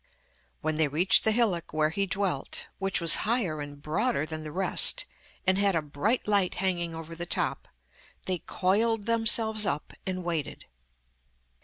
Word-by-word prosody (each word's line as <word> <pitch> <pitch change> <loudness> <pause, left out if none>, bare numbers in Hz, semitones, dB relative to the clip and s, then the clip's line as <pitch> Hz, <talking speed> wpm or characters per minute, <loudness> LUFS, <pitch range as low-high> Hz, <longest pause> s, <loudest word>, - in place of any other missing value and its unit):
When 155 0 -2
they 155 -1 +3
reached 160 +7 +3
the 220 - +2
hillock 210 -9 0
where 155 0 +1
he 195 +3 -1
dwelt, 190 -8 -2
which 195 -1 +1
was 165 -2 +6
higher 205 -10 -1
and 145 0 -9
broader 180 - -1
than 155 0 -6
the 155 -1 -8
rest, 185 +3 +4 0.4
and 190 +1 +2
had 200 -2 +2
a 160 - +1
bright 170 - -2
light 200 -3 +1
hanging 175 -3 -1
over 165 0 -8
the 175 +1 -6
top, - - 0 0.6
they 185 -2 -2
coiled 210 +5 0
themselves 225 -1 +3
up 190 - -2
and 185 -1 -3
waited. 165 -4 -4
185 Hz, 160 wpm, -27 LUFS, 155-205 Hz, 0.6 s, was